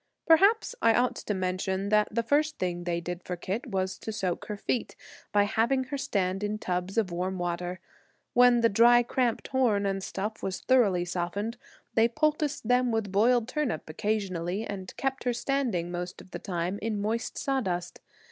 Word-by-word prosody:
Perhaps 395 +7 +5
I 230 0 +5
ought 250 +1 +2
to 210 - -3
mention 190 +1 -1
that 210 0 +4
the 230 +2 -1
first 300 +5 +1
thing 175 -1 -2
they 170 -1 0
did 175 +1 -5
for 180 - -4
Kit 190 +8 -4
was 190 -3 -2
to 220 - -5
soak 190 -5 -2
her 210 - -5
feet, 235 +3 -2 0.4
by 205 -1 +4
having 230 +6 +1
her 260 +2 -4
stand 195 -5 -1
in 210 +1 -1
tubs 180 0 -3
of 210 -5 +1
warm 185 +2 -2
water. 175 +1 -3 0.5
When 245 -1 +6
the 230 - +6
dry, 240 +3 +6
cramped 240 -1 -1
horn 235 -7 +2
and 195 0 -1
stuff 210 +3 -4
was 190 -1 -3
thoroughly 205 -9 +3
softened, 180 +6 -3 0.4
they 225 0 +5
poulticed 300 0 0
them 250 0 +3
with 220 -3 -1
boiled 230 +3 +3
turnip 260 - -2
occasionally 190 +1 -2
and 190 -3 -6
kept 270 0 -2
her 245 - +2
standing 235 -10 -1
the 175 - -3
most 175 0 -6
of 185 - -14
the - - -5
time 180 0 -3
in 215 -1 -2
moist 220 +3 -2
sawdust. 185 -11 -2
210 Hz, 185 wpm, -28 LUFS, 185-240 Hz, 0.5 s, When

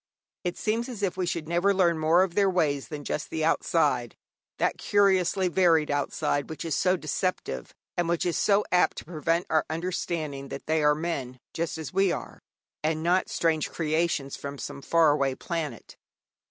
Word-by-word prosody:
It 180 -1 -2
seems 230 +3 -1
as 220 -5 -6
if 190 - 0
we 185 -1 -1
should 165 -3 -3
never 175 +4 +2
learn 170 -4 +3
more 165 +4 +4
of 185 -3 -2
their 200 +1 +3
ways 150 -7 0
than 150 -2 -6
just 150 - -3
the 160 -1 -1
outside 165 - +1 0.4
that - - 0
curiously 190 -2 +3
varied 165 -4 +3
outside 145 0 -1
which 160 +1 -6
is 165 - -1
so 185 0 +2
deceptive, 175 +3 -3 0.2
and 175 -2 0
which 170 0 0
is 175 - 0
so 205 0 +3
apt 180 - +3
to - - -7
prevent 165 +1 0
our 155 -1 +3
understanding 160 -4 -3
that - - -7
they 160 0 +1
are 150 0 +5
men 145 -6 -3 0.2
just 165 -1 -2
as 160 0 -6
we 195 -1 +3
are, - - -5 0.4
and 155 0 0
not 180 +2 +2
strange 160 -2 +1
creations 155 -3 -1
from 140 0 -7
some 140 0 -6
far 165 +1 +4
away 140 -2 +1
planet. 155 -9 -5
165 Hz, 180 wpm, -27 LUFS, 150-180 Hz, 0.4 s, are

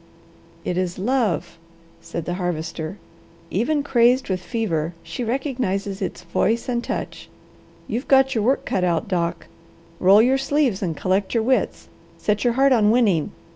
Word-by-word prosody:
"It 180 0 -1
is 180 -1 -2
love," 210 - -1 0.4
said 165 -1 -6
the 175 - -2
Harvester. 165 0 -3 0.5
"Even 280 - +1
crazed 250 -2 +3
with 185 -1 -1
fever, 175 -8 -2
she 165 +9 -5
recognizes 230 -6 -2
its 185 - -4
voice 205 +6 0
and 240 -1 -1
touch. - - -5 0.6
You've 240 +5 -3
got 270 -1 +4
your 220 -4 0
work 260 +5 +1
cut 185 - -1
out, 175 +4 0
Doc. 170 -3 -1 0.5
Roll 195 +4 +6
your 265 +2 +3
sleeves 275 -6 +1
and 165 -6 -2
collect 190 +4 0
your 225 - +2
wits. 260 +3 0 0.3
Set 210 0 0
your 240 - +2
heart 270 +2 +4
on 220 -5 +4
winning. 215 -9 +2
210 Hz, 155 wpm, -22 LUFS, 180-250 Hz, 0.6 s, Roll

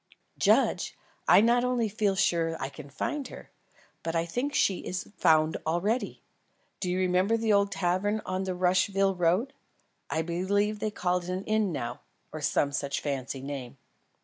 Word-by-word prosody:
"Judge, - - +2 0.3
I - - +7
not 240 +2 +4
only 250 -2 +1
feel 205 -2 0
sure 170 -4 +2
that 165 - -5
I 135 - -2
can 140 - -11
find 275 - -3
her, - - -12 0.5
but 165 0 -3
I 165 0 +1
think 245 - -2
she 190 - +2
is 185 +3 -5
found 155 -1 +3
already. 190 +9 -1 0.6
Do 180 - -2
you 180 - 0
remember 185 +4 +2
the 225 -1 +2
old 200 0 +3
tavern 190 +4 0
on 185 +1 -2
the 185 -1 -2
Rushville 190 +2 +2
road? 180 +9 +1 0.6
I 160 - 0
believe 200 +5 0
they 215 - -1
call 180 -3 0
it 175 0 -8
an 185 +1 -2
inn 215 -2 +1
now, 120 -7 -4 0.3
or 155 - -6
some 145 -1 +1
such 140 0 -2
fancy 135 -2 -3
name." 135 -2 -6
185 Hz, 175 wpm, -28 LUFS, 165-205 Hz, 0.6 s, I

